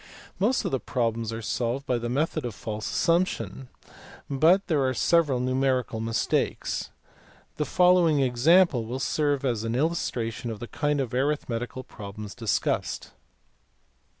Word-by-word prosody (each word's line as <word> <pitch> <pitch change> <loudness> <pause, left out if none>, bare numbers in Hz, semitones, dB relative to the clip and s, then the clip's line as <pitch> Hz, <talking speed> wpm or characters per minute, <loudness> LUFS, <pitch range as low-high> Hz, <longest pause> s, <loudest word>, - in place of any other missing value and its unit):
Most 225 +7 +2
of - - -1
the 135 - 0
problems 115 -3 -1
are 115 0 -5
solved 125 +5 -2
by 125 -3 0
the 120 0 -3
method 155 +4 0
of 120 -4 -4
false 110 0 -5
assump 170 +2 +3
tion - - -5
(see - - -16
above, 130 -2 -15
p. - - -12
104), - - -2
but 180 +6 +5
there 155 -6 +1
are 130 -1 0
several 150 -3 +3
numerical 130 -2 0
mis 115 0 -1
takes. - - -1 0.7
The 150 - 0
following 180 -4 +4
example 135 +1 +4
will 120 +3 -4
serve 145 0 0
as 115 -4 0
an 115 +1 -2
illustration 125 -5 -1
of 110 -2 -5
the 120 - -6
kind 145 +3 -1
of 125 -2 -4
arithmetical 130 -2 -2
problems 105 -2 -8
discussed. 115 -5 -1
130 Hz, 165 wpm, -26 LUFS, 115-150 Hz, 0.7 s, but